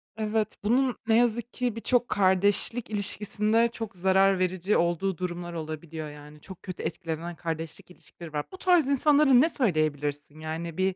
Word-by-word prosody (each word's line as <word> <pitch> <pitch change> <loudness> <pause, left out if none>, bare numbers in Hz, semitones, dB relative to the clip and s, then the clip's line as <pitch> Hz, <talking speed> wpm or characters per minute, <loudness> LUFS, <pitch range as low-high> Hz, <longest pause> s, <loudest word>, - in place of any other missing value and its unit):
Evet, 215 0 -1
bunun 250 +3 +2
ne 220 - +4
yazık 240 0 +1
ki 245 -3 -2
birçok 245 +1 0
kardeşlik 200 +5 +2
ilişkisinde 210 +2 +1
çok 225 -4 -7
zarar 190 +1 +3
verici 185 +2 +1
olduğu 175 +1 0
durumlar 175 -1 -5
olabiliyor, 155 -1 -6
yani. 150 0 -13
Çok 190 -2 -12
kötü 185 -2 -7
etkilenen 165 0 -4
kardeşlik 165 +1 -6
ilişkileri 170 -2 -13
var. 145 0 -2
Bu 375 - -9
tarz 355 -7 +3
insanlara 290 +1 +4
ne 275 +7 +6
söyleyebilirsin, 155 - -1
yani, 160 +2 -5
bir 190 0 +1
190 Hz, 155 wpm, -27 LUFS, 165-225 Hz, -, ne